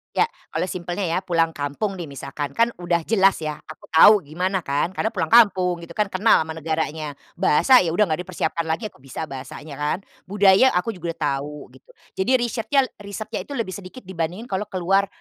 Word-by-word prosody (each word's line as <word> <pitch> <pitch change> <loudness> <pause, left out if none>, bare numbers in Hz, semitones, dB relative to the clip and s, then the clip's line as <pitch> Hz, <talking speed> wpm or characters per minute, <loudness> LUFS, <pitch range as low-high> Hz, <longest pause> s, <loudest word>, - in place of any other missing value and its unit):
Iya. 445 - +3 0.2
Kalau - - -1
simpelnya 180 +2 -4
ya 165 +1 0
pulang 165 -3 +1
kampung 145 +8 -3
nih, 180 - -5
misalkan, 140 -1 -6
kan 230 +11 +3
udah 175 -1 0
jelas 195 -3 +4
ya 155 -2 -3
aku 155 - -13
tahu 165 +6 +8
gimana 185 +5 -1
kan 145 +1 -1
karena 190 - -2
pulang - - -2
kampung, 190 -6 +5
gitu 170 - -11
kan, 210 -2 0
kenal 190 -2 +4
sama 160 - -7
negaranya, 155 -2 -3 0.2
bahasa? 220 - +5
Ya 170 -4 0
udah 210 - +4
enggak 155 - 0
dipersiapkan 165 -2 -2
lagi 210 +7 -2
aku - - -24
bisa 135 +4 -7
bahasanya 140 +1 -8
kan, 150 +2 0 0.3
budaya? 200 +4 +5
Aku 180 +6 0
juga 170 -5 -5
udah - - -40
tahu, 145 +1 -2 0.2
gitu. - - -38 0.3
Jadi 190 +7 +1
risyretnya 240 +4 0 0.2
risetnya 210 +2 -6
itu 285 - -6
lebih 230 -7 -2
sedikit 195 +6 -9
dibandingin 185 +5 -5
kalau 195 +2 -2
keluar, 195 +2 +1
180 Hz, 195 wpm, -22 LUFS, 155-200 Hz, 0.3 s, tahu